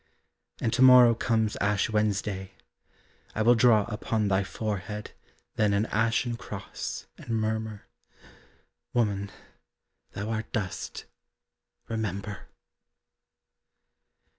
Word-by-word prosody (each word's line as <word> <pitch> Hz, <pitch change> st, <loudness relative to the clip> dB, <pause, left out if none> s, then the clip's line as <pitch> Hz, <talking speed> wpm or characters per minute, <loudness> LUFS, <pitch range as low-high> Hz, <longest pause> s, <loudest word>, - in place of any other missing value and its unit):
And 115 Hz, -, 0 dB
to 130 Hz, -, +1 dB
morrow 125 Hz, -2 st, +9 dB
comes 110 Hz, -2 st, 0 dB
Ash 100 Hz, -1 st, +1 dB
Wednesday, 105 Hz, -3 st, -1 dB, 0.8 s
I 110 Hz, -, +1 dB
will 120 Hz, +2 st, +7 dB
draw 115 Hz, -3 st, +5 dB
upon 105 Hz, -1 st, -1 dB
thy 95 Hz, 0 st, +2 dB
forehead 105 Hz, +1 st, -4 dB, 0.5 s
Then 105 Hz, -2 st, +3 dB
an 100 Hz, +2 st, +2 dB
ashen 115 Hz, +2 st, +1 dB
cross, 105 Hz, -5 st, -6 dB
and -, -, -12 dB
murmur, 110 Hz, -1 st, -2 dB, 1.1 s
Woman, 100 Hz, -4 st, +1 dB, 0.8 s
thou 105 Hz, +3 st, -4 dB
art 110 Hz, 0 st, -3 dB
dust 100 Hz, -7 st, -4 dB, 0.8 s
remember! 105 Hz, -4 st, -4 dB
110 Hz, 95 wpm, -28 LUFS, 100-115 Hz, 1.1 s, morrow